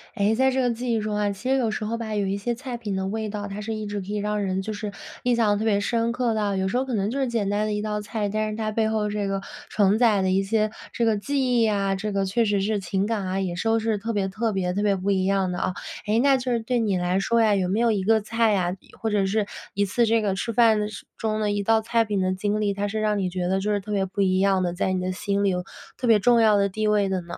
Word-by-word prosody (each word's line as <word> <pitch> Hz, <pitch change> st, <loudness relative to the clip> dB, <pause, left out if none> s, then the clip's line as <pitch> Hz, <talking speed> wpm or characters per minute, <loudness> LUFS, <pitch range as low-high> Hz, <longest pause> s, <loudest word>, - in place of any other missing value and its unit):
诶， 210 Hz, +1 st, +2 dB
在 265 Hz, +3 st, +3 dB
这 265 Hz, -, +1 dB
个 245 Hz, -1 st, +2 dB
记 240 Hz, +1 st, -3 dB
忆 225 Hz, -, +1 dB
中 210 Hz, 0 st, -2 dB
啊， 205 Hz, -1 st, +1 dB
其 205 Hz, +6 st, -5 dB
实 270 Hz, -, +3 dB
有 235 Hz, -4 st, +1 dB
时 215 Hz, -, -3 dB
候 230 Hz, +2 st, -2 dB
吧， 220 Hz, -2 st, -4 dB
有 205 Hz, -, 0 dB
一 195 Hz, +1 st, -1 dB
些 235 Hz, +4 st, -2 dB
菜 250 Hz, 0 st, -6 dB
品 210 Hz, -4 st, -4 dB
的 190 Hz, 0 st, -2 dB
味 215 Hz, +2 st, -3 dB
道， 205 Hz, 0 st, -4 dB
它 200 Hz, +1 st, -6 dB
是 220 Hz, +1 st, -4 dB
一 215 Hz, -1 st, -4 dB
直 205 Hz, 0 st, -3 dB
可 190 Hz, -, -8 dB
以 210 Hz, -, -3 dB
让 210 Hz, 0 st, -1 dB
人， 190 Hz, 0 st, -1 dB
就 215 Hz, +3 st, -4 dB
是 205 Hz, 0 st, -5 dB, 0.3 s
印 245 Hz, -1 st, +2 dB
象 215 Hz, -3 st, +2 dB
特 220 Hz, -, -2 dB
别 205 Hz, -2 st, +3 dB
深 230 Hz, +2 st, 0 dB
刻 240 Hz, -1 st, 0 dB
的。 205 Hz, -2 st, 0 dB
有 190 Hz, 0 st, 0 dB
时 195 Hz, -, 0 dB
候 260 Hz, -, 0 dB
可 260 Hz, -, -4 dB
能 200 Hz, 0 st, 0 dB
就 265 Hz, +5 st, -2 dB
是 265 Hz, -, +1 dB
简 225 Hz, -4 st, -1 dB
单 205 Hz, +1 st, 0 dB
的 215 Hz, -, -1 dB
一 210 Hz, -, -1 dB
道 210 Hz, 0 st, -2 dB
菜， 210 Hz, 0 st, -3 dB
但 215 Hz, +1 st, -1 dB
是 215 Hz, -, -4 dB
它 215 Hz, -1 st, -2 dB
背 220 Hz, 0 st, +1 dB
后 215 Hz, -1 st, 0 dB
这 205 Hz, -1 st, -2 dB
个 195 Hz, 0 st, -2 dB, 0.3 s
承 205 Hz, 0 st, +3 dB
载 220 Hz, -4 st, +4 dB
的 190 Hz, 0 st, +1 dB
一 190 Hz, +1 st, +3 dB
些 215 Hz, +2 st, 0 dB, 0.2 s
这 235 Hz, -, 0 dB
个 220 Hz, -2 st, +2 dB
记 255 Hz, +1 st, +1 dB
忆 225 Hz, -, +4 dB
啊， 200 Hz, -2 st, 0 dB
这 210 Hz, +2 st, -3 dB
个 195 Hz, -1 st, 0 dB
确 225 Hz, +5 st, +1 dB
实 205 Hz, -2 st, +1 dB
是 210 Hz, +1 st, 0 dB
情 190 Hz, +1 st, -1 dB
感 210 Hz, -3 st, -2 dB
啊， 185 Hz, +1 st, -1 dB
也 185 Hz, -3 st, -2 dB
是 180 Hz, -, -2 dB
都 225 Hz, 0 st, +3 dB
是 220 Hz, -1 st, 0 dB
特 225 Hz, +3 st, -3 dB
别 200 Hz, -2 st, 0 dB
特 215 Hz, +3 st, -2 dB
别 185 Hz, -2 st, -1 dB
特 200 Hz, -, -1 dB
别 205 Hz, -1 st, +2 dB
不 195 Hz, +1 st, -1 dB
一 190 Hz, -1 st, +1 dB
样 195 Hz, -1 st, +1 dB
的 175 Hz, -, -3 dB
啊。 185 Hz, -, -1 dB, 0.3 s
诶， 215 Hz, +2 st, +2 dB
那 275 Hz, +1 st, +4 dB
就 255 Hz, 0 st, -3 dB
是 235 Hz, -, +1 dB
对 240 Hz, +2 st, -1 dB
你 205 Hz, -5 st, +1 dB
来 180 Hz, +1 st, 0 dB
说 230 Hz, +4 st, +2 dB
呀， 215 Hz, -2 st, +4 dB
有 190 Hz, -2 st, 0 dB
没 200 Hz, +4 st, +1 dB
有 235 Hz, -1 st, +3 dB
一 200 Hz, -3 st, 0 dB
个 220 Hz, +2 st, +3 dB
菜 225 Hz, 0 st, +1 dB
啊， 180 Hz, -2 st, 0 dB
一 -, -, -22 dB
或 225 Hz, -, -2 dB
者 205 Hz, -2 st, +1 dB
是 205 Hz, +2 st, 0 dB, 0.3 s
一 200 Hz, 0 st, +1 dB
次 235 Hz, +5 st, +1 dB
这 225 Hz, 0 st, +2 dB
个 205 Hz, -2 st, 0 dB
吃 210 Hz, +4 st, -2 dB
饭 225 Hz, -1 st, +5 dB
的 210 Hz, -, -1 dB
时 210 Hz, -, -9 dB
中 215 Hz, -1 st, -1 dB
的 210 Hz, -1 st, 0 dB
一 205 Hz, 0 st, 0 dB
道 225 Hz, +2 st, +3 dB
菜 230 Hz, +1 st, +1 dB
品 205 Hz, -2 st, -1 dB
的 185 Hz, 0 st, +1 dB
经 205 Hz, +2 st, -1 dB
历， 205 Hz, -1 st, +1 dB
它 200 Hz, +1 st, -2 dB
是 215 Hz, +2 st, -3 dB
让 210 Hz, -1 st, +1 dB
你 185 Hz, -2 st, 0 dB
觉 180 Hz, 0 st, -2 dB
得 190 Hz, +1 st, +1 dB
就 210 Hz, +2 st, -1 dB
是 205 Hz, -, +1 dB
特 205 Hz, +2 st, -8 dB
别 195 Hz, -2 st, +1 dB
不 195 Hz, +2 st, -3 dB
一 185 Hz, -1 st, +2 dB
样 195 Hz, -1 st, +3 dB
的， 175 Hz, -1 st, -1 dB
在 185 Hz, +1 st, -1 dB
你 185 Hz, -, -1 dB
的 185 Hz, 0 st, -1 dB
心 200 Hz, +2 st, -1 dB
里 200 Hz, -, +3 dB
有 180 Hz, -1 st, -1 dB, 0.3 s
特 250 Hz, -, -2 dB
别 225 Hz, -2 st, +6 dB
重 235 Hz, +2 st, +4 dB
要 215 Hz, -2 st, +5 dB
的 200 Hz, 0 st, +2 dB
地 215 Hz, +3 st, -1 dB
位 210 Hz, -1 st, +3 dB
的 190 Hz, -1 st, -1 dB
呢？ 170 Hz, 0 st, -8 dB
210 Hz, 345 characters per minute, -24 LUFS, 195-225 Hz, 0.3 s, 别